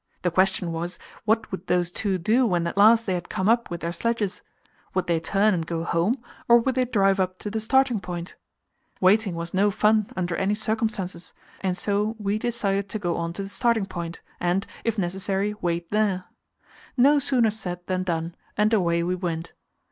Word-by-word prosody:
The 180 - +1
question 185 -1 +2
was, 170 +2 -4 0.3
what 220 +1 +1
would 185 -1 -6
those 175 -1 +1
two 195 +1 -1
do 220 +9 +2
when 175 -4 +1
at 170 - -3
last 225 +3 +6
they 190 - 0
had 175 -1 -4
come 190 - -1
up 235 +1 +3
with 170 -1 -5
their 170 +1 -2
sledges? 210 +1 -1 0.5
Would 185 - +1
they 170 -1 +1
turn 200 +6 +2
and 170 -2 -1
go 165 0 -3
home, 200 +10 0 0.2
or 235 - +8
would 260 +3 +1
they 255 0 +1
drive 195 -5 +2
up 185 0 0
to 205 - -6
the 220 - -1
starting 255 0 +2
point? 175 -1 -6 0.7
Waiting 195 0 +3
was 170 0 -5
no 200 +2 +3
fun 215 +1 +2
under 175 -2 -1
any 195 +2 +1
circumstances, 215 -5 -2 0.2
and 185 -2 -1
so 210 +2 0
we 210 0 -1
decided 200 -4 -1
to 215 - -2
go 175 -5 -1
on 170 0 -2
to 195 - -5
the 195 - -7
starting 230 -1 +1
point, 170 -2 -6 0.2
and, 180 +3 0 0.2
if 230 -1 -1
necessary, 195 +2 -1
wait 170 -1 -2
there. 205 -3 +1 0.7
No 285 +4 +6
sooner 245 -5 +2
said 180 -4 -5
than 185 0 -1
done, 170 -2 -2 0.2
and 210 +2 +3
away 170 -5 +2
we 180 +2 0
went. 175 -2 -4
195 Hz, 195 wpm, -25 LUFS, 175-215 Hz, 0.7 s, or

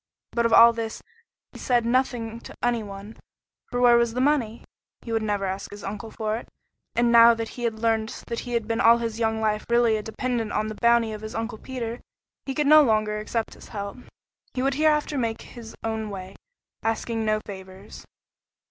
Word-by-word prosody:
But 235 -1 +2
of 230 - -1
all 235 0 +9
this 225 -1 -5 0.5
he - - -12
said 240 -2 +1
nothing 235 -2 0
to - - -12
any 240 -1 +1
one, 200 +1 -9 0.5
for 245 - -2
where 240 -1 +6
was 235 -1 +1
the - - -1
money? 255 -5 +1 0.4
He 230 - -7
would 225 -1 +1
never 205 -2 -1
ask 190 +1 -4
his 205 0 -10
uncle 210 +3 -6
for 215 0 -2
it, 235 - -9 0.5
and 235 0 +3
now 235 0 +8
that 225 0 -4
he 240 - -5
had 225 -1 -1
learned 220 -1 +1 0.2
that 235 - -4
he 245 - -6
had 230 -2 -1
been 225 0 0
all 230 +1 +7
his 230 -1 -4
young 220 -1 0
life 215 -1 0
really 235 -2 +3
a - - -3
dependent 225 0 -3
on 215 - 0
the 215 - -6
bounty 235 -1 +4
of 215 -1 -6
his 215 0 -7
Uncle 225 -1 -4
Peter, 240 -2 -5 0.5
he 270 - -3
could 300 - +1
no 305 +2 +8
longer 215 -5 +1
accept 220 +1 -3
his - - -14
help. 200 0 -6 0.6
He 255 - -1
would 275 +1 +2
hereafter 300 -1 +2
make 230 -2 -2
his 230 -2 -11
own 220 -1 -2
way, 190 -1 -8 0.5
asking 225 0 -1
no 215 0 +1
favors. 190 -1 -10
225 Hz, 205 wpm, -25 LUFS, 215-235 Hz, 0.6 s, all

